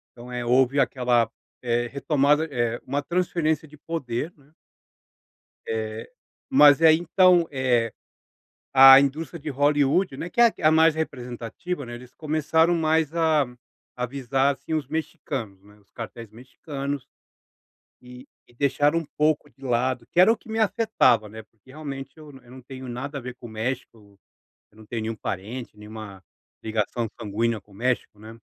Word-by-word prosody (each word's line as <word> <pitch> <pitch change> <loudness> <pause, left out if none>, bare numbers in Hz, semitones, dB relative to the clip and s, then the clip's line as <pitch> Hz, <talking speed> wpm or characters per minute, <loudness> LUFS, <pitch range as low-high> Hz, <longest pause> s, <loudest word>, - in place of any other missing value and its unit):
Então 120 +1 -11
é 125 -1 -4
houve 130 +3 +3
aquela, 120 -4 +2 0.3
eh, 120 -1 -1
retomada 145 +3 +1 0.4
uma 140 +2 -1
transferência 165 -2 -1
de 150 +1 -16
poder, 150 -1 -4
né. 145 +1 -25 1.1
Eh. 110 0 -4 0.4
Mas 145 +1 +7
aí 160 -1 +7
então, 175 -1 +4
eh, 125 -4 +1 0.8
a 135 0 +10
indústria 155 +4 -2
de 150 0 -6
Hollywood, 145 +4 +2
né, 175 - -5
que - - -6
é 235 -2 +6
a 155 - +6
mais 160 0 +5
representativa, 130 - -5
né, 120 0 -7
eles 125 +1 -13
começaram 160 +2 +1
mais 160 -1 +1
a 160 -4 +3 0.5
a 125 - 0
visar 135 +2 0
assim 160 - -5
os 150 -4 -2
mexicanos, 140 - -5
né, 105 0 -19
os 100 - -30
cartéis 115 -1 -9
mexicanos, 140 +3 -6 0.9
e 125 +2 -13 0.2
e - - -23
deixaram 145 +5 +2
um 165 - -7
pouco 150 0 +1
de 135 - -29
lado 125 0 0
que - - +1
era 190 +5 +7
o 230 - 0
que 220 - -19
me 220 0 -2
afetava, 210 - +2
né, 110 +1 -10 0.2
realmente 135 -1 -7
eu 155 -2 -12
eu 120 - -18
não 130 - -11
tenho 130 0 -10
nada 135 +4 -5
a 140 - -6
ver 125 0 -7
com 120 - -9
o - - -12
México, 115 +2 -4
né, 100 -1 -21 0.6
eu 105 - -24
não 110 - -14
tenho 115 0 -4
nenhum 110 0 -3
parente, 105 +4 -6
nenhuma 105 -3 -10 0.4
ligação 110 +1 -2
sanguínea 110 +2 -1
com 105 - -26
o - - -16
México, 120 -1 -2
né. 110 +2 -11
135 Hz, 165 wpm, -24 LUFS, 120-155 Hz, 1.1 s, a